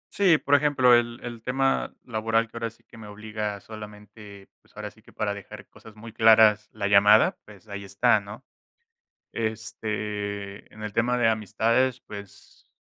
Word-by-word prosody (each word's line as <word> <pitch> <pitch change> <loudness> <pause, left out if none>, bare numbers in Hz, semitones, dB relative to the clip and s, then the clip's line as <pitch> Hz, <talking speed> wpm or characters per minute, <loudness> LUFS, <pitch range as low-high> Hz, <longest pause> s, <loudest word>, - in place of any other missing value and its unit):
Sí, 185 -6 +5
por 140 - -2
ejemplo, 140 -4 +4
el 120 0 +2
el 120 -2 -7
tema 135 +2 0
laboral 115 0 0
que 115 - -22
ahora 115 -1 -3
sí 115 - -25
que 115 - -16
me 105 - -10
obliga 105 0 -5
solamente, 105 -2 -12
pues - - -29
ahora - - -6
sí - - -23
que - - -19
para 105 -1 -2
dejar 100 -1 -11
cosas 110 -1 -16
muy 110 +1 -11
claras 110 -2 +5
la 100 - -5
llamada, 105 +2 +5
pues 105 +1 -16
ahí 100 0 -7
está, 100 +4 +2
¿no?, 105 +5 -11 0.9
este, 105 -2 -5
en 110 0 -11
el 105 -1 -5
tema 125 +2 +1
de 120 - +3
amistades, 115 +4 0
pues, 100 -2 -13
110 Hz, 170 wpm, -25 LUFS, 105-115 Hz, 0.9 s, Sí